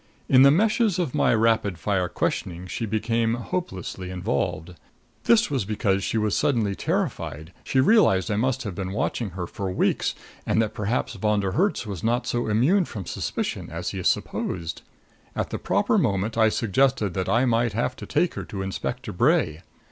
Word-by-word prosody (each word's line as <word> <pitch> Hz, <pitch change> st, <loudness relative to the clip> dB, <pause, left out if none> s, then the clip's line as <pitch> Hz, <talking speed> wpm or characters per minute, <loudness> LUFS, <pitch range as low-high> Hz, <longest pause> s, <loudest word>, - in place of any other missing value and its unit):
In 130 Hz, -, +6 dB
the 135 Hz, -, +8 dB
meshes 215 Hz, -, +3 dB
of 170 Hz, -8 st, -1 dB
my -, -, +3 dB
rapid 110 Hz, -5 st, +2 dB
fire 90 Hz, -1 st, 0 dB
questioning 90 Hz, 0 st, -2 dB
she 110 Hz, +5 st, -4 dB
became 115 Hz, +2 st, 0 dB
hopelessly 95 Hz, -, -5 dB
involved. 90 Hz, -1 st, -2 dB, 0.5 s
This 230 Hz, -6 st, +4 dB
was 135 Hz, -6 st, 0 dB
because 100 Hz, -1 st, 0 dB
she 115 Hz, -, -1 dB
was 105 Hz, -2 st, +1 dB
suddenly 115 Hz, -8 st, +1 dB
terrified 80 Hz, -3 st, -3 dB
she 135 Hz, -, +1 dB
realized 130 Hz, -, +4 dB
I -, -, +1 dB
must 130 Hz, +4 st, 0 dB
have 105 Hz, -5 st, -4 dB
been 95 Hz, +1 st, -4 dB
watching 115 Hz, +1 st, -1 dB
her 90 Hz, -, -2 dB
for 95 Hz, +2 st, -5 dB
weeks, 90 Hz, -, 0 dB, 0.3 s
and -, -, +1 dB
that 110 Hz, -1 st, +1 dB
perhaps 115 Hz, +4 st, -1 dB
Von 105 Hz, 0 st, +1 dB
der 95 Hz, -1 st, -1 dB
Herts 190 Hz, -, +1 dB
was 100 Hz, -5 st, -6 dB
not 120 Hz, +2 st, +1 dB
so 120 Hz, -1 st, -1 dB
immune 140 Hz, -, +3 dB
from 100 Hz, -, -7 dB
suspicion -, -, -3 dB
as -, -, -4 dB
he -, -, -4 dB
supposed. 85 Hz, -2 st, -2 dB, 0.5 s
At -, -, -2 dB
the -, -, -3 dB
proper -, -, +2 dB
moment 100 Hz, +3 st, 0 dB
I 110 Hz, -1 st, +4 dB
suggested 115 Hz, -2 st, +1 dB
that 95 Hz, 0 st, -2 dB
I 120 Hz, +3 st, +3 dB
might 120 Hz, -2 st, +1 dB
have 120 Hz, +3 st, -1 dB
to -, -, -8 dB
take 175 Hz, -, +1 dB
her -, -, -5 dB
to 95 Hz, -2 st, -5 dB
Inspector 120 Hz, +5 st, -4 dB
Bray. 100 Hz, -, +2 dB
110 Hz, 180 wpm, -25 LUFS, 95-125 Hz, 0.5 s, the